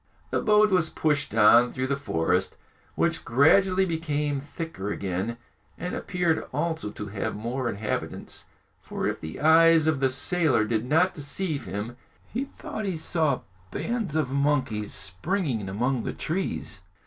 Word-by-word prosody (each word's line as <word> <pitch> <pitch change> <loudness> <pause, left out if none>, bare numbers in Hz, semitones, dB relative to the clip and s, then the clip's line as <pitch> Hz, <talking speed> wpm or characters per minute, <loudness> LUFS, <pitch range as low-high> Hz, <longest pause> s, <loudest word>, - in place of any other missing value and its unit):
The - - +1
boat 210 -1 +4
was 180 -4 +4
pushed 150 -8 0
on 115 +3 +6
through 130 0 -2
the 140 +1 0
forest, 90 - 0 0.4
which - - +1
gradually 185 +9 +4
became 150 -4 -1
thicker 145 - -5
again, 100 +5 -3 0.4
and 180 - -4
appeared 175 -3 0
also 160 -9 -1
to 105 0 -7
have 100 0 -3
more 120 +4 -2
inhabitants; 105 0 -4 0.4
for - - -4
if - - -2
the 80 - -7
eyes 165 +1 +6
of 160 -3 +2
the 135 -1 +3
sailor 145 -3 +2
did 110 +1 -1
not 165 +6 +3
deceive 150 +1 -3
him, 110 +5 -5 0.4
he 255 +5 -1
thought 220 -5 -7
he 190 -4 -2
saw 160 -2 0 0.3
bands 225 - -3
of 150 -5 0
monkeys 130 -7 0
springing 105 - -2
among 120 +6 0
the - - -4
trees. 155 - -3
145 Hz, 150 wpm, -26 LUFS, 110-165 Hz, 0.4 s, on